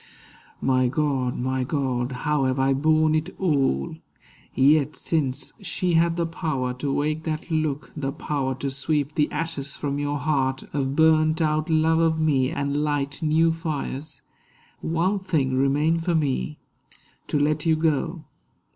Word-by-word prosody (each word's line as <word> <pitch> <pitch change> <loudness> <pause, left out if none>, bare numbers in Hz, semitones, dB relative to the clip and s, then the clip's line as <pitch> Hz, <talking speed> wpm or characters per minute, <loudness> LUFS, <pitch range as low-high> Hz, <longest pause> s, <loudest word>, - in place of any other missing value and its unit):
My 130 -1 +2
God, 130 -2 0
my 130 +1 -1
God, 130 -2 -1
how 150 -2 +1
have 130 0 0
I 135 0 +3
borne 155 +2 +3
it 155 +4 -1
all! 135 - +1 0.6
Yet 145 +2 +4
since 140 -1 -1
she 180 -1 -1
had 165 +1 +3
the 170 -1 0
power 155 -7 -2
to 140 0 -1
wake 150 +2 0
that 160 +1 -4
look— 155 -2 -1
The 140 -3 -2
power 135 -2 -2
to 135 +1 -3
sweep 145 +1 -1
the 150 -1 +1
ashes 150 -3 -3
from 145 -1 -3
your 145 0 -1
heart 135 -3 0
Of 135 -1 -1
burned 160 0 +4
out 155 -1 0
love 160 0 +3
of 160 -1 +2
me, 140 -5 +2
and 140 0 -2
light 145 -2 -1
new 160 +1 +3
fires, 155 -2 -5 0.6
One 175 +5 0
thing 155 -9 0
remained 145 +5 +2
for 170 0 +1
me—to 150 0 -4
let 150 +2 +1
you 160 - +4
go. 160 +1 0
150 Hz, 150 wpm, -24 LUFS, 135-160 Hz, 0.6 s, Yet